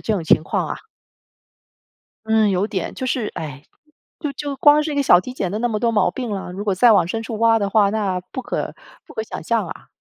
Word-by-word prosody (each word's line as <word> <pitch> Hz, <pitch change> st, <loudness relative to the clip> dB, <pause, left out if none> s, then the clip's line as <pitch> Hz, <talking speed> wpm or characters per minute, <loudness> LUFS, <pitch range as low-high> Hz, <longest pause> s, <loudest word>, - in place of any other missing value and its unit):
这 220 Hz, -, -1 dB
种 175 Hz, -5 st, -3 dB
情 -, -, +4 dB
况 -, -, -1 dB
啊。 -, -, -3 dB, 1.5 s
嗯， 220 Hz, -2 st, +4 dB
有 190 Hz, +2 st, +1 dB
点， 195 Hz, -4 st, -3 dB
就 260 Hz, -, -5 dB
是 240 Hz, -4 st, -1 dB
唉， 145 Hz, -3 st, -6 dB, 0.6 s
就 295 Hz, -4 st, -3 dB
就 280 Hz, 0 st, -5 dB
光 295 Hz, +1 st, +5 dB
是 305 Hz, -, -3 dB
一 -, -, -4 dB
个 285 Hz, -, +3 dB
小 175 Hz, -5 st, +6 dB
体 255 Hz, -, -8 dB
检 195 Hz, -7 st, -3 dB
都 215 Hz, -, -2 dB
那 240 Hz, -, +1 dB
么 215 Hz, -2 st, -1 dB
多 235 Hz, 0 st, +1 dB
毛 210 Hz, -, +3 dB
病 250 Hz, -3 st, -5 dB
了， 195 Hz, -3 st, -4 dB
如 195 Hz, +3 st, -6 dB
果 200 Hz, -3 st, +1 dB
再 235 Hz, +5 st, +5 dB
往 200 Hz, -5 st, +5 dB
深 225 Hz, +5 st, -3 dB
处 225 Hz, -1 st, -5 dB
挖 230 Hz, 0 st, +4 dB
的 200 Hz, -1 st, -1 dB
话， 205 Hz, -1 st, +4 dB
那 200 Hz, -4 st, -1 dB
不 260 Hz, -, -4 dB
可， -, -, -3 dB, 0.3 s
不 -, -, -14 dB
可 220 Hz, -, -2 dB
想 -, -, -7 dB
象 230 Hz, -4 st, +1 dB
啊。 -, -, -9 dB
220 Hz, 265 characters per minute, -21 LUFS, 195-245 Hz, 1.5 s, 小